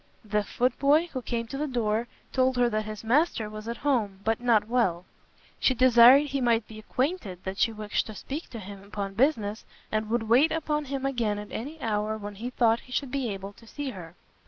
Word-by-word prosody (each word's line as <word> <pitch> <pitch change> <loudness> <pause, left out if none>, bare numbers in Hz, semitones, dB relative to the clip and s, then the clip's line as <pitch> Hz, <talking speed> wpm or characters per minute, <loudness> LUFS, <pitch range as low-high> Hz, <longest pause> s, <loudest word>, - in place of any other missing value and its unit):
The 210 0 0
foot 250 +4 -1
boy, 300 +5 +4
who 260 - -3
came 235 -1 -3
to 270 +4 -6
the 300 - -1
door, 230 -3 0 0.3
told 260 -1 +2
her 245 -1 +4
that 215 0 -1
his 215 0 -7
master 235 -3 +1
was 215 +1 -8
at 235 - -3
home, 210 -9 +1
but 225 +1 +1
not 225 -4 +3
well. 190 -8 +1 0.5
She 260 - +3
desired 255 +2 +7
he 275 -1 -1
might 235 -3 +2
be 215 -1 -10
acquainted 225 - -2
that 190 +1 -5
she 230 - +3
wished 215 -1 -2
to 215 - -8
speak 290 - -6
to 235 - -8
him 200 -1 -9
upon 200 -1 -5
business, 220 -3 +1 0.3
and 215 0 -1
would 235 0 +1
wait 245 +8 +4
upon 300 -2 -1
him 270 0 -3
again 235 -6 0
at 210 0 -8
any 295 +7 -6
hour 215 -1 -1
when 205 -1 -7
he 225 +5 -5
thought 235 -2 +2
he 255 - -17
should 265 0 -2
be 270 -3 -1
able 195 0 -6
to 230 - -18
see 285 +2 -5
her. 175 -5 -10
230 Hz, 220 wpm, -27 LUFS, 210-260 Hz, 0.5 s, desired